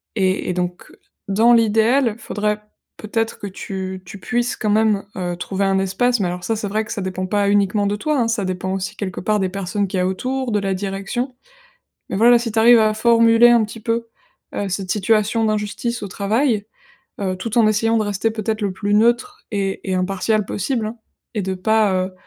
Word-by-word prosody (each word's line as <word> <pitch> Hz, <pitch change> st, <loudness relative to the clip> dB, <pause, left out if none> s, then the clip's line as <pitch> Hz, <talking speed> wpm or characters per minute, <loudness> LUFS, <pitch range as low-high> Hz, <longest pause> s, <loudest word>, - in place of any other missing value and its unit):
et 190 Hz, -3 st, 0 dB
et -, -, 0 dB
donc 180 Hz, 0 st, -4 dB, 0.4 s
dans 225 Hz, +5 st, +5 dB
l'idéal, 230 Hz, +2 st, +3 dB
faudrait 210 Hz, 0 st, -2 dB, 0.4 s
peut-être 225 Hz, +1 st, -2 dB
que 205 Hz, -, -5 dB
tu 190 Hz, -1 st, -6 dB
tu 185 Hz, +3 st, -10 dB
puisses 240 Hz, +4 st, -1 dB
quand 215 Hz, -, -1 dB
même, 210 Hz, -1 st, +2 dB
heu, 175 Hz, -2 st, -3 dB
trouver 190 Hz, +2 st, -2 dB
un 195 Hz, 0 st, +2 dB
espace 215 Hz, +6 st, +1 dB
mais 190 Hz, -, +1 dB
alors, 180 Hz, 0 st, -5 dB
ça 225 Hz, +3 st, -1 dB
c'est 210 Hz, -, -3 dB
vrai 215 Hz, +2 st, -1 dB
que 220 Hz, -, -10 dB
ça 205 Hz, -, -3 dB
dépend 185 Hz, 0 st, -3 dB
pas 200 Hz, 0 st, +1 dB
uniquement 205 Hz, 0 st, +2 dB
de 205 Hz, -, 0 dB
toi, 295 Hz, +7 st, -1 dB
hein. 235 Hz, -, +2 dB
Ça 225 Hz, -2 st, 0 dB
dépend 185 Hz, 0 st, -3 dB
aussi, 190 Hz, -1 st, -4 dB
quelque 190 Hz, -3 st, -4 dB
part, 210 Hz, +3 st, +1 dB
des 190 Hz, -, +1 dB
personnes 195 Hz, +1 st, -2 dB
qu'il 185 Hz, 0 st, -2 dB
y -, -, +2 dB
a 180 Hz, -, +1 dB
autour, 255 Hz, +6 st, -2 dB
de 210 Hz, -, +2 dB
la 195 Hz, -1 st, -1 dB
direction, 200 Hz, +7 st, -3 dB, 0.8 s
mais -, -, -2 dB
voilà, 240 Hz, +3 st, +6 dB
si 230 Hz, -1 st, -4 dB
tu 225 Hz, -, -1 dB
arrives 235 Hz, +1 st, +7 dB
à 215 Hz, -1 st, +3 dB
formuler 230 Hz, +1 st, +5 dB
un 235 Hz, -2 st, +5 dB
petit 220 Hz, +2 st, -9 dB
peu, 230 Hz, +1 st, -1 dB, 0.5 s
heu, 200 Hz, -, -2 dB
cette 185 Hz, 0 st, -2 dB
situation 220 Hz, +2 st, +1 dB
d'injustice 215 Hz, +2 st, -2 dB
au -, -, -5 dB
travail, 215 Hz, +3 st, 0 dB, 0.6 s
heu, 190 Hz, -2 st, -1 dB
tout 225 Hz, +5 st, -2 dB
en 225 Hz, -, +5 dB
essayant 225 Hz, +2 st, +2 dB
de -, -, +1 dB
rester 205 Hz, +2 st, -1 dB
peut-être 220 Hz, 0 st, -3 dB
le 200 Hz, -, 0 dB
plus 205 Hz, +2 st, -1 dB
neutre 240 Hz, -, +2 dB
et 195 Hz, -1 st, -2 dB
et -, -, +1 dB
impartiale 195 Hz, +3 st, 0 dB
possible, 225 Hz, +2 st, -2 dB
hein, 220 Hz, +2 st, -6 dB, 0.4 s
et 210 Hz, -, -1 dB
de 190 Hz, 0 st, -2 dB
pas, 215 Hz, +2 st, +2 dB
heu, 185 Hz, -, -10 dB
210 Hz, 215 wpm, -20 LUFS, 195-230 Hz, 0.8 s, arrives